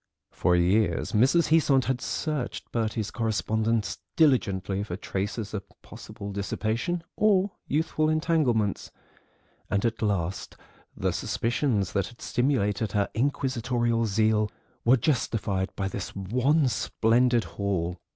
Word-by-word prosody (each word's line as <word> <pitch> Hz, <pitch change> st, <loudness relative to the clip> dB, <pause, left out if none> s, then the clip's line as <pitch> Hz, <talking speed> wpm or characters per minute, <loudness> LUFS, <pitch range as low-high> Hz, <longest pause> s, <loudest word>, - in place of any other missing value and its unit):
For 90 Hz, -1 st, +2 dB
years 95 Hz, +5 st, +2 dB
Mrs. 135 Hz, +10 st, +3 dB
Heasant 145 Hz, -5 st, +4 dB
had 130 Hz, -1 st, -1 dB
searched 150 Hz, -5 st, -3 dB
Bertie's 110 Hz, -2 st, -1 dB
correspondence 110 Hz, -2 st, 0 dB, 0.2 s
diligently 100 Hz, -, +2 dB
for 100 Hz, -4 st, -4 dB
traces 105 Hz, +2 st, -4 dB
of 105 Hz, -, -2 dB, 0.2 s
possible 100 Hz, 0 st, -9 dB
dissipation 110 Hz, -, -2 dB
or 200 Hz, -2 st, +3 dB, 0.2 s
youthful 155 Hz, +1 st, +1 dB
entanglements, 155 Hz, -, +1 dB, 0.8 s
and 100 Hz, +3 st, 0 dB
at 115 Hz, -2 st, -1 dB
last 95 Hz, -4 st, -2 dB, 0.4 s
the -, -, 0 dB
suspicions 115 Hz, -, 0 dB
that 100 Hz, -, 0 dB
had 120 Hz, -, -14 dB
stimulated 110 Hz, -5 st, 0 dB
her 100 Hz, -2 st, +1 dB
inquisitorial 120 Hz, -3 st, 0 dB
zeal 110 Hz, +1 st, +2 dB, 0.3 s
were 125 Hz, +3 st, +5 dB
justified 110 Hz, -7 st, 0 dB
by 95 Hz, -, -2 dB
this 95 Hz, 0 st, -5 dB
one 125 Hz, -, +2 dB
splendid 120 Hz, 0 st, +2 dB
haul. 90 Hz, -3 st, -2 dB
115 Hz, 115 wpm, -27 LUFS, 100-130 Hz, 0.8 s, were